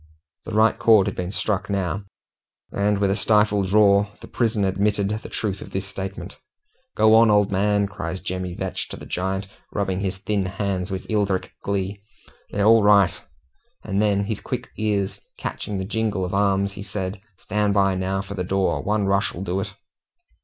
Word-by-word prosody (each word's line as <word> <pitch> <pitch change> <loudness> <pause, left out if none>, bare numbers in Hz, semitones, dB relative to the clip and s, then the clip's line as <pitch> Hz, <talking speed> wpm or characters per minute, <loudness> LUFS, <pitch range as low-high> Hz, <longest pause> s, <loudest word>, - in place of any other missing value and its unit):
The 110 - -6
right 110 +1 +3
chord 110 -4 +6
had - - -3
been 90 0 -3
struck 105 -1 -1
now, 100 0 -1 0.7
and 100 +1 +1
with 100 -1 +2
a - - +1
stifled 105 -2 +2
roar 100 -1 +5
the - - -11
prison 110 -4 0
admitted 100 +1 +1
the 105 +1 -4
truth 100 -3 -3
of - - -8
the 95 - -2
sentiment. 95 0 -6 0.6
"Go 110 0 +5
on, 115 0 +7
old 105 -1 +4
man!" 100 +1 +2
cries 95 -3 -5
Jemmy 90 -1 -4
Vetch - - -3
to - - -6
the - - -10
giant, 95 +2 -2 0.2
rubbing 95 -2 -1
his 95 -1 -2
thin 100 -1 -1
hands 95 -1 -2
with 95 -1 -4
eldritch 100 -4 0
glee. 100 0 -2 0.5
"They're 100 0 0
all 115 +1 +7
right!" 100 -3 +4 0.6
And 100 +1 0
then, 100 -1 +2
his 105 0 -3
quick 125 0 -4
ears 105 -3 -1 0.2
catching 105 - -4
the 95 - -3
jingle 105 -2 -1
of 90 - -5
arms, 100 0 +2
he 100 - -8
said, 95 -1 -4 0.2
"Stand 105 +1 0
by 95 -1 +4
now 95 +1 -1
for 100 0 -7
the 95 -2 -2
door 95 +1 0
one 105 0 0
rush'll 100 -2 0
do 95 0 -1
it." 100 0 -4
100 Hz, 180 wpm, -23 LUFS, 95-105 Hz, 0.7 s, on